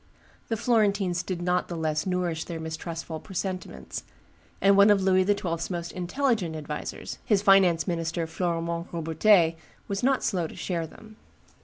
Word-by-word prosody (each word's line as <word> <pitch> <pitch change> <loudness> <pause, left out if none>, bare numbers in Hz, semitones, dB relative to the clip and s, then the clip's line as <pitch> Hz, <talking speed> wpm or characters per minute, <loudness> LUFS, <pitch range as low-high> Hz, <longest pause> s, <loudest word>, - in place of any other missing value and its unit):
The 225 - -1
Florentines 205 -6 +2
did 175 -1 -4
not 180 0 +1
the 170 - -5
less 155 +1 -1
nourish 180 -3 -1
their 165 -2 -5
mistrustful 160 0 -5
presentiments; 185 0 -5 0.6
and 200 0 +5
one 200 +1 +7
of 200 -2 +4
Louis 185 0 +4
XII.'s 185 -4 -1
most 170 -2 -4
intelligent 185 - -1
advisers, 150 -1 -6
his 205 -3 +2
finance 190 -4 +5
minister 165 -1 -1
Florimond 170 0 -2
Robertet, 165 +1 +3 0.3
was 200 0 -2
not 265 +1 +2
slow 180 -5 0
to - - -12
share 170 -3 -3
them. 215 +6 -15
180 Hz, 150 wpm, -27 LUFS, 165-195 Hz, 0.6 s, one